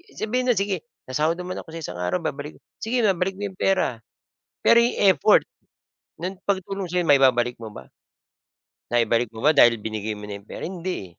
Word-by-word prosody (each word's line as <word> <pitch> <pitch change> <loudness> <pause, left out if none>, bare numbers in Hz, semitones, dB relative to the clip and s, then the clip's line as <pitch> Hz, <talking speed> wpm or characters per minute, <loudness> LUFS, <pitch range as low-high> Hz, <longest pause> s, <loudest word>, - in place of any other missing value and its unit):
sabihin 250 +4 -1
na, 245 - +4
"Sige, 195 +1 -2 0.2
sasahod 150 +6 0
naman 180 +1 -6
ako 160 - -11
sa 165 - -6
isang 90 -10 -6
araw 90 0 -1
babalik," 145 +1 -5 0.2
Sige 235 +1 -1
babalik 190 -1 +1
mo 205 - -7
'yong 185 - -21
pera, 185 -11 +1 0.6
pero 235 - +6
'yong 235 +1 +2 0.2
effort, 210 +3 +4 0.7
ng 185 +3 -4
pagtulong 195 -1 -2
sa'yo, 180 0 0
maibabalik 130 -5 +4
mo 110 - -7
ba? 100 -11 -11 1.1
Naibalik 120 -1 +1
mo 110 - -9
ba 150 0 +4
dahil 115 -4 +6
binigay 110 0 -4
mo 105 - -9
na 100 - -5
'yong 100 +1 -15
pera? - - -7
Hindi, 185 0 -4
eh. 85 - -21
165 Hz, 190 wpm, -23 LUFS, 115-195 Hz, 1.1 s, pero